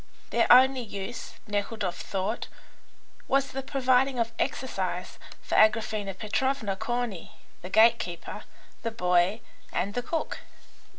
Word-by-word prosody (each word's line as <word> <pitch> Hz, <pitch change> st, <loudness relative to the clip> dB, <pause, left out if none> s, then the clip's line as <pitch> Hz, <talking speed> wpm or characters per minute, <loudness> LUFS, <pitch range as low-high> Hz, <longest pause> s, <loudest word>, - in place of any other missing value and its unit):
Their -, -, +3 dB
only 260 Hz, +1 st, +7 dB
use, 220 Hz, +1 st, -6 dB
Nekhludoff 205 Hz, -2 st, -2 dB
thought, 195 Hz, +4 st, -3 dB, 0.8 s
was 275 Hz, 0 st, +2 dB
the 270 Hz, -, -3 dB
providing 265 Hz, -1 st, +2 dB
of 230 Hz, -1 st, 0 dB
exercise 260 Hz, 0 st, -2 dB, 0.2 s
for -, -, -6 dB
Agraphena 215 Hz, -2 st, +3 dB
Petrovna, 220 Hz, -1 st, -1 dB
Corney, 225 Hz, -3 st, -3 dB, 0.3 s
the 180 Hz, -, -7 dB
gate 225 Hz, +3 st, +6 dB
keeper, 175 Hz, -1 st, -6 dB, 0.4 s
the 230 Hz, -, -1 dB
boy, 180 Hz, 0 st, +2 dB, 0.3 s
and 200 Hz, +3 st, -1 dB
the 245 Hz, -, -1 dB
cook. 320 Hz, +6 st, -3 dB
225 Hz, 120 wpm, -28 LUFS, 200-250 Hz, 0.8 s, only